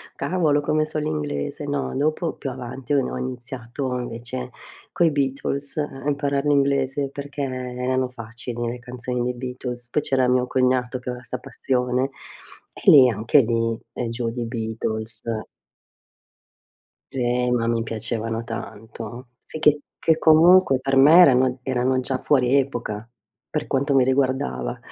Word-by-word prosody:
Cavolo 155 -5 +1
come 155 +1 +1
so 155 - -5
l'inglese. 75 - -3
No, 145 -1 -2
dopo 155 +4 0
più 135 - -5
avanti 130 +1 -5
ho 140 - +4
no - - -4
ho - - -3
iniziato 125 0 -4
invece 125 +1 -6 0.4
coi 170 -2 +3
Beatles 140 0 -2
a 145 -3 -3
imparar 140 -1 0
l'inglese 140 -1 +1
perché 145 +1 -6
erano 130 0 -2
facili 120 0 -6
le 120 +1 -4
canzoni 125 0 -4
dei 125 +1 -1
Beatles. 125 -1 -6
Poi 150 - +1
c'era 130 -3 +1
mio 125 0 +2
cognato 130 -1 +1
che 125 - -7
aveva 125 0 -6
'sta 125 - -4
passione 125 +1 -1 0.6
e - - +2
lì 130 -4 +9
anche 115 +5 +3
lì, 115 -1 0 0.3
giù 115 0 -2
di 120 +1 -4
Beatles. 110 -1 -3 1.9
Eh, 125 -1 0
ma 115 -2 +1
mi 115 -1 +1
piacevano 115 0 -3
tanto. 115 +1 -8
Sì 155 - -7
che 150 -1 +4 0.2
che 160 -1 +3
comunque 160 -2 +6
per 135 +1 0
me 150 +6 +8
erano 130 -4 +5
erano 130 0 +1
già 130 0 -2
fuori 130 -2 +3
epoca 120 -5 -2 0.4
per 150 - -2
quanto 140 +1 +1
mi 130 - +6
riguardava. 130 - 0
130 Hz, 145 wpm, -23 LUFS, 120-140 Hz, 1.9 s, lì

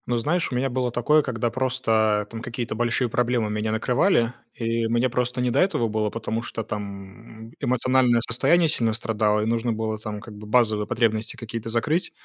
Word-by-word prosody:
Ну, 120 - +1
знаешь, 160 +8 0
у - - -2
меня 130 +2 0
было 125 -1 -1
такое, 150 +6 +3
когда 120 -4 -2
просто, 110 -5 +1
там, 115 -1 -6
какие-то 120 -1 -4
большие 120 +2 0
проблемы 120 -2 0
меня 105 +1 -1
накрывали, 120 - +2 0.2
и 115 0 -1
мне 120 +3 +1
просто 125 +1 -1
не 125 -1 +1
до - - +1
этого 180 -11 +2
было, 105 0 0
потому 115 +1 -3
что, 115 -1 -5
там, 105 +2 -8
эмоциональное 125 -1 +2
состояние 165 +9 +3
сильно 115 -7 +1
страдало, 110 -2 +1
и - - -1
нужно 115 +1 0
было, 110 -1 -3
там, 105 -1 -5
как 110 +1 -11
бы, 105 0 -10
базовые 110 -2 +2
потребности 110 -1 0
какие-то 115 0 -6
закрыть. 130 +10 0
115 Hz, 185 wpm, -24 LUFS, 110-125 Hz, 0.2 s, такое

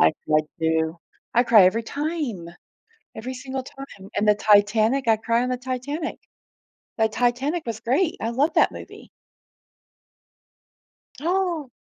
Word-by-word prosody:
I 80 0 +5
cry 155 0 +3 0.2
too. 160 +1 0 0.3
I 240 - +5
cry 225 -6 +6
every 220 +5 +2
time, 285 - -4 0.7
every 245 +4 -6
single 260 +1 -5
time, 255 -7 -12
and 210 - +1
the 210 - +6
Titanic, 215 +5 +3
I 225 -1 +4
cry 230 +2 0
on 250 - -2
the 250 - 0
Titanic. 260 +6 -4 0.8
The 220 -1 +2
Titanic 250 +9 -1
was 225 -2 -5
great, 290 +9 +1
I 225 - -1
love 280 +7 +1
that - - +4
movie. - - -11 2.1
Oh. 340 -4 -1
240 Hz, 135 wpm, -23 LUFS, 215-275 Hz, 2.1 s, cry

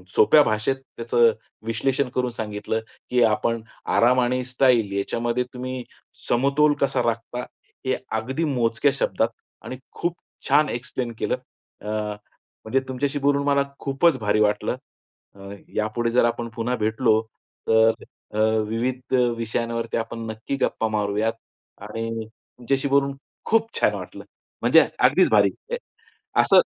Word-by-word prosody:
सोप्या 150 +7 +7
भाषेत 110 +5 0
त्याचं 120 -3 +1 0.3
विश्लेषण 130 +4 0
करून 125 -1 0
सांगितलं, 110 -1 -3 0.3
की 125 -1 +2
आपण 110 +1 +1 0.4
आराम 125 +2 +5
आणि 125 +1 +1
स्टाईल 125 -5 +3
याच्यामध्ये 120 +4 -1
तुम्ही 130 0 -5 0.5
समतोल 140 +4 +3
कसा 140 - +2
राखता. 115 +1 -2 0.4
हे 130 - +1 0.2
अगदी 130 +8 -2
मोजक्या 130 -1 +2
शब्दात 115 -4 +1 0.4
आणि 130 - -6
खूप 175 0 -2 0.3
छान 150 0 +4
एक्सप्लेन 120 0 -4
केलं. - - 0 0.5
अ, - - -9 0.8
म्हणजे 130 +5 +2
तुमच्याशी 135 +2 -2
बोलून 140 0 +2
मला 140 0 +4 0.2
खूपच 140 +2 +2
भारी 105 0 +1
वाटलं. 105 -1 +1 0.6
अ, - - -17 0.4
यापुढे 110 +2 0
जर 120 0 +4
आपण 120 0 -1
पुन्हा 120 +2 -1
भेटलो 110 0 +2 0.5
तर 110 0 +5 0.4
अ, - - -4 0.3
विविध 125 +3 -3 0.2
विषयांवरती 115 0 -2
आपण 115 0 -4
नक्की 110 +5 -4
गप्पा 110 - +1
मारूयात 105 +1 0 0.5
आणि 115 +1 -4
तुमच्याशी 130 +4 -3
बोलून 140 0 +2 0.3
खूप 225 0 +2
छान - - +3
वाटलं. - - -8 0.4
म्हणजे - - +6
अगदीच - - +5
भारी. - - +5 0.2
अ, - - +1 0.7
असं - - +6
120 Hz, 130 wpm, -24 LUFS, 110-135 Hz, 0.8 s, सोप्या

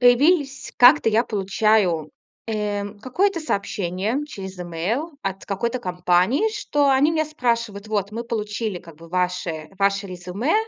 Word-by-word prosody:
появились 275 +3 +3
как-то, 250 0 +7
я 220 +1 +3
получаю, 195 -6 +1 0.4
э, 210 -2 -1 0.2
какое-то 350 - 0
сообщение 200 - -2
через 190 -9 -8
имейл 205 - -3
от 195 0 -4
какой-то 235 +5 -2
компании, 180 - +2
что 290 -8 +1
они 270 +3 +4
меня 315 -1 +1
спрашивают: 235 -8 -2
"Вот 205 -1 -1
мы 230 - -3
получили 215 -3 -3
как 170 -2 -14
бы 165 +1 -14
ваше 180 -3 -2
ваше 200 0 +2
резюме, 185 - -2
210 Hz, 135 wpm, -23 LUFS, 185-255 Hz, 0.4 s, как-то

